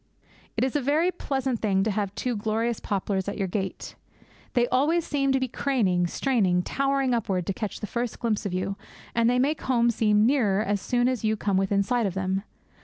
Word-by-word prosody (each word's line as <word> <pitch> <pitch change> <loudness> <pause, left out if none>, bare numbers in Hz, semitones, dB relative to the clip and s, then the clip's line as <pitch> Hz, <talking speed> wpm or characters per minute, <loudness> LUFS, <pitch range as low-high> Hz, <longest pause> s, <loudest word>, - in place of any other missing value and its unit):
It - - +2
is 260 +1 -1
a 295 - +2
very 305 +7 +2
pleasant 265 -8 -2
thing 195 -3 +2
to 220 - 0
have 205 -1 -2
two 250 -2 -2
glorious 220 +2 -1
poplars 195 -1 -2
at 200 - -5
your 195 -2 -1
gate. 190 0 -4 0.6
They 245 -1 +3
always 310 +6 +2
seem 275 -2 +1
to 265 - +2
be 260 - -1
craning, 205 -10 +1
straining, 190 -6 +1
towering 275 0 0
upward 195 -6 -1
to 195 - -1
catch 210 0 -5
the - - -2
first 235 +2 -3
glimpse 225 -3 0
of 200 - -3
you; 185 +2 -2 0.4
and 230 0 +3
they 250 - +2
make 285 +5 +1
home 235 -2 +2
seem 210 -1 +3
nearer 220 -6 +2
as 205 -1 -1
soon 245 +2 +1
as 255 -3 -1
you 220 0 +1
come 200 -1 0
within 195 +1 +2
sight 240 +1 +1
of 190 - -5
them. 190 0 -1
225 Hz, 210 wpm, -26 LUFS, 195-255 Hz, 0.6 s, They